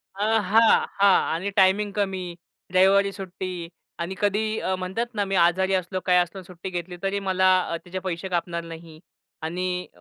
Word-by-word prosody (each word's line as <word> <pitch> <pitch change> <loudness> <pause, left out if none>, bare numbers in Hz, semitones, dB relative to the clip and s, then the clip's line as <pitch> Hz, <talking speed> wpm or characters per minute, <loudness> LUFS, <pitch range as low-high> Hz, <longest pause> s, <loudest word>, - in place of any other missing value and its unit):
अ, 200 - -2 0.2
हां, 220 +4 +4
हां. 200 -1 +6 0.2
आणि 180 +5 -2
टायमिंग 200 +2 +4
कमी 195 -2 -1 0.5
रविवारी 195 +2 +4
सुट्टी 185 -3 -6 0.3
आणि 175 +3 -3
कधीही 215 +2 0 0.2
म्हणतात 190 +6 -2
ना, 205 -1 0
मी 195 0 -2
आजारी 185 +2 +3
असलो, 185 0 -1
काय 180 -1 +4
असलो 180 +2 0
सुट्टी 180 +1 -8
घेतली, 175 0 -5
तरी 195 +1 0
मला 190 -1 +1 0.4
त्याचे 180 +1 -7
अ, - - -4
पैसे 185 +1 -4
कापणार 170 -1 -2
नाही. 165 -1 -11 0.4
आणि 180 +3 -3
185 Hz, 160 wpm, -24 LUFS, 175-195 Hz, 0.5 s, हां